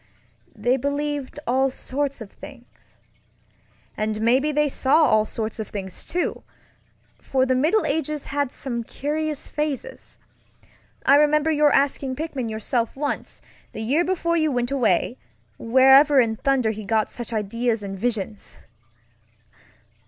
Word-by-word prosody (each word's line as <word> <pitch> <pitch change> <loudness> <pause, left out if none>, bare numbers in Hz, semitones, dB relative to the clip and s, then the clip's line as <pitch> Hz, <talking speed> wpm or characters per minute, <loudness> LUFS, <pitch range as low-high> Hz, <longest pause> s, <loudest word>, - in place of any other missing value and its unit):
They 250 +2 +1
believed 285 +1 -3
all 265 +2 +2
sorts 275 +1 -3
of 210 - -10
thingsŌĆöand 215 0 -10
maybe 255 +7 +2
they 300 0 +2
saw 285 +3 +3
all 215 -4 +3
sorts 220 +1 -4
of 215 - -4
things, 190 -3 -6
too, 355 +1 -2 0.8
for 260 -1 0
the 260 - +1
Middle 315 +12 +2
Ages 305 0 -2
had 285 -1 -1
some 240 -3 -4
curious 300 +4 -3
phases. 300 - -5 0.9
I 280 +2 +7
remember 300 +1 +3
your 300 -1 +4
asking 275 -1 +1
Pickman 275 -6 -4
yourself 225 +2 -2
once, 290 +1 -4 0.3
the 220 - -5
year 285 +10 +2
before 340 -2 0
you 310 -2 +2
went 245 -1 -1
away, 240 -3 +1 0.4
wherever 265 +4 +6
in 225 -3 +2
thunder 255 -2 +1
he 215 0 -7
got 215 +1 0
such 240 -2 -6
ideas 225 +1 -1
and 195 -1 -5
visions. 210 -1 -4
265 Hz, 130 wpm, -23 LUFS, 225-295 Hz, 0.9 s, I